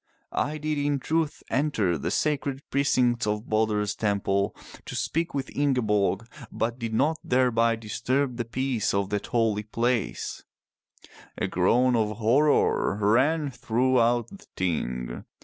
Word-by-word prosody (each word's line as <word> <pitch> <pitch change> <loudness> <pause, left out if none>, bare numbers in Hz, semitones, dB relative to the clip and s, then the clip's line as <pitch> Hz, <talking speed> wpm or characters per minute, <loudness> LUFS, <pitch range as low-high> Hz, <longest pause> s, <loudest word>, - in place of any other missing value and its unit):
I 150 +1 -1
did 150 0 -2
in 145 0 +1
truth 160 +2 -1
enter 130 - +1
the 70 - -3
sacred 140 -2 -1
pre 140 - +2
cincts 125 -4 +2
of 105 +2 -2
Balder*s 105 -1 +1
temple 100 -1 0 0.3
to - - -6
speak 165 -1 -1
with 135 - -4
Ingeborg, 115 -7 +1 0.2
but 120 +2 -2
did 115 -2 -3
not 150 +8 +1
thereby 115 -2 +2
disturb 120 +4 -1
the 120 - -2
peace 125 -3 -1
of 100 0 -1
that 105 -1 -2
holy 115 -3 +1
place/' 115 +1 -2 1.0
A - - 0
groan 120 +8 +3
of 110 -2 0
horror 120 -2 +3
ran 135 +8 +2
throughout 120 -1 +1
the 200 0 -13
Ting. 65 -9 -2
120 Hz, 135 wpm, -26 LUFS, 105-140 Hz, 1.0 s, groan